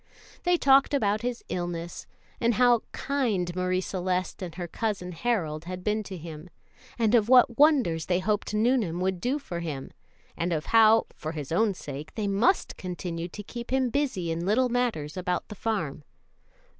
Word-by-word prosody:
They 355 Hz, 0 st, +4 dB
talked 275 Hz, -1 st, +5 dB
about 210 Hz, -5 st, +1 dB
his 245 Hz, 0 st, -3 dB
illness, 175 Hz, -1 st, -4 dB, 0.3 s
and 235 Hz, 0 st, +2 dB
of -, -, -4 dB
how 245 Hz, -2 st, +5 dB
kind 215 Hz, -11 st, -1 dB
Marie 185 Hz, 0 st, 0 dB
Celeste 185 Hz, -1 st, -2 dB
and 175 Hz, -4 st, -6 dB
her 175 Hz, -1 st, -4 dB
Cousin 195 Hz, -2 st, -3 dB
Harold 165 Hz, -6 st, -1 dB
had 180 Hz, 0 st, -6 dB
been 210 Hz, +2 st, 0 dB
to 190 Hz, -1 st, -7 dB
him, 160 Hz, +1 st, -9 dB, 0.5 s
and 225 Hz, -2 st, +2 dB
of 230 Hz, -2 st, +4 dB
what 250 Hz, -1 st, +6 dB
wonders 260 Hz, -, +4 dB
they 180 Hz, -, +2 dB
hoped 205 Hz, +3 st, -1 dB
Nuneham 215 Hz, -6 st, +1 dB
would 185 Hz, -1 st, -1 dB
do 260 Hz, +4 st, 0 dB
for 185 Hz, -12 st, -6 dB
him, 150 Hz, -6 st, -5 dB, 0.4 s
and 175 Hz, +1 st, -1 dB
of 155 Hz, -2 st, -2 dB
how, 225 Hz, 0 st, +6 dB
for 155 Hz, 0 st, -5 dB
his 150 Hz, -3 st, -6 dB
own 200 Hz, +3 st, +2 dB
sake, 145 Hz, -1 st, -8 dB
they 215 Hz, -, -2 dB
must 205 Hz, -, +2 dB
continue 175 Hz, -1 st, -4 dB
to 205 Hz, +4 st, -8 dB
keep 235 Hz, +3 st, -8 dB
him 260 Hz, -2 st, +1 dB
busy 235 Hz, -, -1 dB
in 165 Hz, +1 st, -2 dB
little 235 Hz, +7 st, +2 dB
matters 230 Hz, -12 st, -1 dB
about 180 Hz, -1 st, -2 dB
the -, -, -6 dB
farm. 180 Hz, -10 st, -3 dB
190 Hz, 180 wpm, -27 LUFS, 170-235 Hz, 0.5 s, what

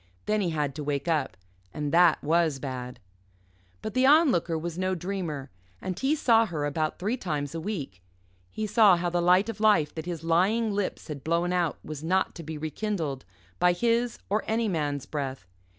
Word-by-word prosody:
Then 215 Hz, 0 st, +1 dB
he 180 Hz, -, 0 dB
had 150 Hz, -4 st, -1 dB
to 150 Hz, -, -6 dB
wake 140 Hz, +1 st, -2 dB
up. 150 Hz, -, 0 dB, 0.4 s
And 150 Hz, -1 st, -2 dB
that 170 Hz, -1 st, +5 dB
was 160 Hz, -1 st, +2 dB
bad. 130 Hz, -2 st, -6 dB, 0.8 s
But 215 Hz, -, -4 dB
the 255 Hz, +1 st, +3 dB
Onlooker 270 Hz, -, +4 dB
was 165 Hz, +1 st, -4 dB
no 185 Hz, +1 st, -1 dB
dreamer, 170 Hz, -6 st, -4 dB, 0.3 s
and 185 Hz, -1 st, -4 dB
he 275 Hz, +3 st, +2 dB
saw 230 Hz, -6 st, +4 dB
her 155 Hz, -5 st, -3 dB
about 155 Hz, +1 st, -1 dB
three 210 Hz, +7 st, -1 dB
times 150 Hz, -, -3 dB
a 165 Hz, -, -4 dB
week. 150 Hz, -, -5 dB, 0.5 s
He 215 Hz, -, -4 dB
saw 210 Hz, -3 st, +5 dB
how 175 Hz, 0 st, -1 dB
the 175 Hz, 0 st, +1 dB
light 180 Hz, +4 st, +4 dB
of 230 Hz, -, -5 dB
life 210 Hz, -9 st, +3 dB
that 160 Hz, +1 st, -6 dB
his 170 Hz, -3 st, -4 dB
lying 195 Hz, +7 st, +2 dB
lips 200 Hz, -1 st, -3 dB
had 145 Hz, -4 st, -7 dB
blown 170 Hz, +2 st, 0 dB
out 175 Hz, -3 st, 0 dB
was 155 Hz, -1 st, -7 dB
not 185 Hz, +3 st, +1 dB
to -, -, -8 dB
be 160 Hz, -1 st, -6 dB
rekindled 155 Hz, -3 st, -3 dB, 0.3 s
by 180 Hz, 0 st, +4 dB
his 235 Hz, +5 st, +1 dB
or 210 Hz, +3 st, 0 dB
any 225 Hz, +1 st, +1 dB
man's 145 Hz, -7 st, -2 dB
breath. 135 Hz, -, -4 dB
170 Hz, 190 wpm, -27 LUFS, 150-205 Hz, 0.8 s, that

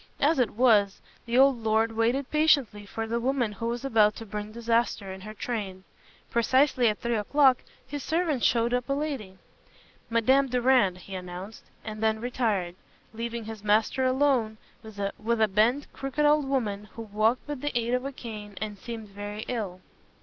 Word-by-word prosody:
As 295 Hz, +1 st, +3 dB
it 240 Hz, -5 st, +1 dB
was, 210 Hz, -5 st, +4 dB, 0.3 s
the 235 Hz, +1 st, +1 dB
old 265 Hz, -2 st, +5 dB
lord 220 Hz, +1 st, +2 dB
waited 235 Hz, +5 st, 0 dB
patiently 280 Hz, -10 st, +2 dB
for 225 Hz, +2 st, -4 dB
the 230 Hz, +1 st, -1 dB
woman 250 Hz, -2 st, 0 dB
who 230 Hz, +3 st, -5 dB
was 240 Hz, +2 st, -3 dB
about 215 Hz, -5 st, +4 dB
to 225 Hz, -, -8 dB
bring 210 Hz, 0 st, -6 dB
disaster 230 Hz, -4 st, 0 dB
in 190 Hz, -, -10 dB
her 215 Hz, +2 st, -9 dB
train. 200 Hz, -5 st, -4 dB, 0.5 s
Precisely 255 Hz, +2 st, +3 dB
at 210 Hz, -, -2 dB
three 235 Hz, 0 st, -1 dB
o'clock 260 Hz, +4 st, +4 dB, 0.3 s
his 285 Hz, +2 st, -6 dB
servant 320 Hz, -5 st, 0 dB
showed 235 Hz, 0 st, +2 dB
up 250 Hz, +1 st, -1 dB
a -, -, +2 dB
lady. 275 Hz, -10 st, -4 dB, 0.7 s
"Madame 260 Hz, +4 st, +3 dB
Durand," 245 Hz, -6 st, +3 dB
he 190 Hz, +2 st, -11 dB
announced, 185 Hz, +3 st, -7 dB, 0.2 s
and 215 Hz, -1 st, -6 dB
then 220 Hz, 0 st, +1 dB
retired, 220 Hz, -7 st, -1 dB, 0.4 s
leaving 230 Hz, 0 st, -4 dB
his 220 Hz, -2 st, -8 dB
master 215 Hz, +5 st, +2 dB
alone 255 Hz, -4 st, +2 dB, 0.2 s
with 220 Hz, -2 st, -12 dB, 0.4 s
a 220 Hz, -, +4 dB
bent, 225 Hz, +8 st, +1 dB
crooked 275 Hz, +2 st, -1 dB
old 295 Hz, -1 st, +4 dB
woman 215 Hz, -7 st, -1 dB
who 230 Hz, -, -7 dB
walked 215 Hz, +5 st, 0 dB
with 290 Hz, -3 st, -5 dB
the 290 Hz, -4 st, -1 dB
aid 235 Hz, +1 st, -1 dB
of 250 Hz, 0 st, +1 dB
a 275 Hz, -, -4 dB
cane, 210 Hz, -6 st, -9 dB
and 210 Hz, -2 st, -5 dB
seemed 230 Hz, -1 st, -7 dB
very 205 Hz, +2 st, -6 dB
ill. 200 Hz, -7 st, -4 dB
230 Hz, 175 wpm, -27 LUFS, 210-260 Hz, 0.7 s, old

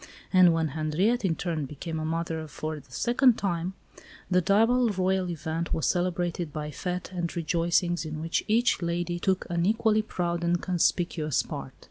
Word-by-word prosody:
And 185 Hz, -2 st, +7 dB
when 165 Hz, -1 st, +1 dB
Henriette, 160 Hz, -, 0 dB
in 170 Hz, -4 st, +1 dB
turn, 160 Hz, -5 st, -2 dB
became 160 Hz, +3 st, -5 dB
a 155 Hz, -, -3 dB
mother 165 Hz, -1 st, -2 dB
for 155 Hz, +1 st, -5 dB
the 135 Hz, -2 st, -20 dB
second 240 Hz, -, +3 dB
time, 180 Hz, -1 st, -2 dB, 0.6 s
the 180 Hz, 0 st, +4 dB
double 225 Hz, +6 st, +3 dB
Royal 190 Hz, -2 st, 0 dB
event 165 Hz, 0 st, -3 dB
was 160 Hz, -, -1 dB
celebrated 175 Hz, -2 st, -1 dB
by 150 Hz, 0 st, -5 dB
fêtes 180 Hz, +4 st, -4 dB
and 170 Hz, -1 st, -2 dB
rejoicings 170 Hz, +1 st, +1 dB
in 155 Hz, -1 st, -5 dB
which 165 Hz, +1 st, -1 dB
each 225 Hz, -1 st, +2 dB
lady 175 Hz, 0 st, -2 dB
took 190 Hz, 0 st, 0 dB
an 170 Hz, 0 st, +1 dB
equally 215 Hz, +2 st, +3 dB
proud 175 Hz, -4 st, -2 dB
and 170 Hz, 0 st, +2 dB
conspicuous 170 Hz, -4 st, +1 dB
part. 65 Hz, -, -7 dB
175 Hz, 165 wpm, -27 LUFS, 160-185 Hz, 0.6 s, And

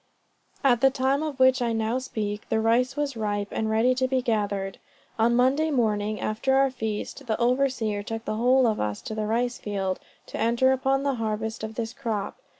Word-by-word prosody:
At 245 Hz, -4 st, +4 dB
the 270 Hz, -, +6 dB
time 270 Hz, +2 st, 0 dB
of 300 Hz, -4 st, -4 dB
which 260 Hz, 0 st, +5 dB
I 235 Hz, -1 st, 0 dB
now 225 Hz, +3 st, 0 dB
speak, 210 Hz, -5 st, -4 dB
the 220 Hz, -, +1 dB
rice 240 Hz, +4 st, +2 dB
was 290 Hz, -3 st, -2 dB
ripe, 205 Hz, -2 st, -2 dB
and 220 Hz, -, -1 dB
ready 225 Hz, +4 st, +3 dB
to 260 Hz, 0 st, 0 dB
be 260 Hz, 0 st, +1 dB
gathered. 205 Hz, -5 st, -1 dB, 0.4 s
On 235 Hz, +2 st, +3 dB
Monday 270 Hz, +6 st, +3 dB
morning, 215 Hz, -5 st, 0 dB
after 230 Hz, +5 st, 0 dB
our 270 Hz, 0 st, +4 dB
feast, 225 Hz, +3 st, -5 dB
the 220 Hz, -, 0 dB
overseer 245 Hz, -4 st, +1 dB
took 225 Hz, +2 st, -6 dB
the 215 Hz, -, -2 dB
whole 255 Hz, +3 st, +4 dB
of 220 Hz, -2 st, +1 dB
us 105 Hz, -1 st, -2 dB
to -, -, -5 dB
the 215 Hz, -1 st, -2 dB
rice 240 Hz, +3 st, 0 dB
field, 195 Hz, -3 st, -2 dB, 0.3 s
to -, -, -7 dB
enter 235 Hz, +4 st, +3 dB
upon 270 Hz, +1 st, +1 dB
the 280 Hz, -1 st, +1 dB
harvest 220 Hz, 0 st, -3 dB
of 220 Hz, 0 st, -5 dB
this 230 Hz, 0 st, -3 dB
crop. 215 Hz, -4 st, -3 dB
230 Hz, 200 wpm, -26 LUFS, 215-260 Hz, 0.4 s, the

